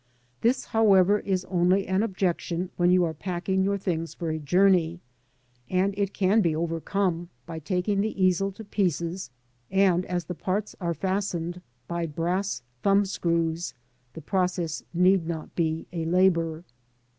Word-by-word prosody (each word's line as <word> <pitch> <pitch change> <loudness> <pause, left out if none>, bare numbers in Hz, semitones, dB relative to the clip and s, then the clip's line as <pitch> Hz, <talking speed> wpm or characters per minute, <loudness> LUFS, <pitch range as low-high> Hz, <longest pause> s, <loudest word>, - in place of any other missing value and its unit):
This, 240 +3 +2
however, 205 -2 +4
is 185 -2 -1
only 185 +1 +2
an 190 +1 +1
objection 185 -3 -1
when 175 0 +3
you 180 0 +5
are 165 -2 -1
packing 185 +3 -1
your 200 +1 +1
things 165 -4 -3
for 165 -2 -3
a 155 - -2
joum^, 175 +1 +3 0.7
and 190 +2 +1
it 200 -1 -1
can 200 +3 +3
be 165 -5 +1
overcome 170 +2 -1 0.2
by 165 -1 -6
taking 185 +4 0
the 215 -1 -3
easel 185 +2 +2
to 220 - -10
pieces, 180 - -1 0.4
and 190 -2 +3
as 175 -2 -2
the 180 - -4
parts 195 +4 -2
are 170 -1 -1
fastened 180 -1 -2 0.3
by 170 -1 -2
brass 170 -2 -2 0.2
thumb 200 0 +4
screws, 170 -3 -1 0.4
the 160 - -8
process 180 -1 -1
need 180 0 +3
not 160 -2 -5
be 160 -1 -1
a 165 -2 -2
labour. 170 -2 +2
180 Hz, 150 wpm, -26 LUFS, 170-195 Hz, 0.7 s, you